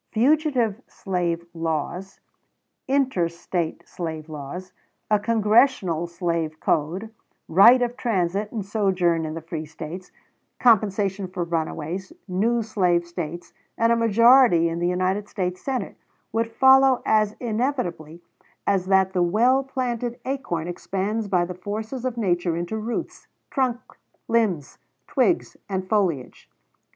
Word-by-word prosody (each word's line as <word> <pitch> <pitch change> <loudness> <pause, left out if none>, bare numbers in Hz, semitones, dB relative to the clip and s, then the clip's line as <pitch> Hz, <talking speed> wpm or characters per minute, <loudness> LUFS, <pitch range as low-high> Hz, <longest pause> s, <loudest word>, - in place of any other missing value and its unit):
Fugitive 250 -3 +2
slave 175 -3 -2
laws, 165 +4 -4 0.7
inter 265 -10 +1
State 170 0 -4
slave 160 -3 -5
trade, 155 +3 -7 0.5
a 210 - +4
Congressional 210 - +2
slave 170 -2 -2
code, 180 +9 -1 0.3
right 230 +9 +7
of 245 0 -2
transit 200 -3 -1
and 215 -4 -4
sojourn 185 -5 +1
in 155 - -5
the 165 - -6
free 160 -1 -5
States, 160 +4 -8 0.5
compensation 200 -4 +2
for 180 -1 -3
runaways, 165 +2 -3 0.2
new 225 +6 +1
slave 180 -5 +1
States, 170 -1 -6 0.2
and 230 +1 +3
a - - +5
majority 230 -5 +5
in 165 +1 -3
the 175 - +1
United 185 +3 -1
States 180 -2 -3
Senate 255 -7 -3 0.3
would 230 0 0
follow, 265 +1 +5
as 215 -1 +2
inevitably 215 - -3 0.4
as 190 -2 +1
that 190 -1 +3
the 180 - +1
well 235 +10 +3
planted 245 -2 -3
acorn 250 - -3
expands 195 +4 -3
by 180 -3 +2
the 180 - -6
forces 215 +7 -5
of 250 -2 -2
nature 175 -5 0
into 175 +5 -3
roots, 220 +2 -4 0.2
trunk, 255 -4 +1 0.5
limbs, 205 -11 0 0.3
twigs, 280 - +1
and 190 -1 -3
foliage. 185 - -1
195 Hz, 125 wpm, -24 LUFS, 170-230 Hz, 0.7 s, right